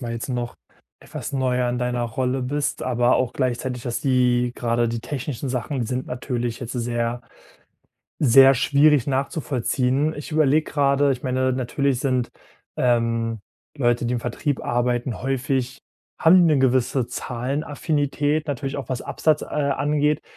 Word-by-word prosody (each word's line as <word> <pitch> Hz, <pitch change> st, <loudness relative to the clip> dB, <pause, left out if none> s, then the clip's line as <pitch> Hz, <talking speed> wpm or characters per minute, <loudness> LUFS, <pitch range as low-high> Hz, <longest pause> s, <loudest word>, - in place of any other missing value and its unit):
mal 120 Hz, -2 st, -4 dB
jetzt 115 Hz, +3 st, -5 dB
noch, 120 Hz, -2 st, -3 dB, 0.4 s
etwas -, -, -7 dB
neuer 125 Hz, -2 st, 0 dB
in 120 Hz, 0 st, -1 dB
deiner 125 Hz, -1 st, -1 dB
Rolle 125 Hz, +2 st, -1 dB
bist, 145 Hz, +3 st, -2 dB
aber 125 Hz, 0 st, +2 dB
auch 125 Hz, -2 st, 0 dB
gleichzeitig, 125 Hz, -1 st, -2 dB
dass 120 Hz, -1 st, -3 dB
die 125 Hz, -2 st, +2 dB
grade 120 Hz, 0 st, 0 dB
die 115 Hz, 0 st, -3 dB
technischen 135 Hz, 0 st, -4 dB
Sachen 130 Hz, +2 st, -2 dB
die 115 Hz, -, -1 dB
sind 125 Hz, +2 st, -3 dB
natürlich 120 Hz, -2 st, -3 dB
jetzt 125 Hz, 0 st, -5 dB
sehr, 120 Hz, -1 st, -2 dB, 1.0 s
sehr 135 Hz, 0 st, +7 dB
schwierig 145 Hz, +1 st, +3 dB
nachzuvollziehen. 135 Hz, 0 st, 0 dB
Ich 150 Hz, +2 st, -8 dB
überlege 155 Hz, 0 st, +2 dB
gerade, 140 Hz, -1 st, +3 dB
ich 125 Hz, -, -4 dB
meine, 130 Hz, 0 st, +1 dB
natürlich 130 Hz, +1 st, -1 dB
sind, 130 Hz, -3 st, 0 dB, 0.5 s
ähm, 115 Hz, -2 st, +1 dB, 0.4 s
Leute, 120 Hz, -4 st, +1 dB
die 120 Hz, -, -1 dB
im 120 Hz, -, -1 dB
Vertrieb 125 Hz, +4 st, -3 dB
arbeiten 120 Hz, 0 st, -1 dB
häufig 130 Hz, -1 st, -1 dB, 0.4 s
haben 170 Hz, +3 st, +6 dB
die 155 Hz, -, +4 dB
'ne -, -, +2 dB
gewisse 130 Hz, -1 st, +2 dB
Zahlenaffinität, 145 Hz, +3 st, -2 dB
natürlich 135 Hz, 0 st, -3 dB
auch 135 Hz, -5 st, -6 dB
was 130 Hz, -1 st, -2 dB
Absatz, 155 Hz, -1 st, 0 dB
äh, -, -, -6 dB
angeht. 150 Hz, +1 st, 0 dB
130 Hz, 150 wpm, -23 LUFS, 120-140 Hz, 1.0 s, sehr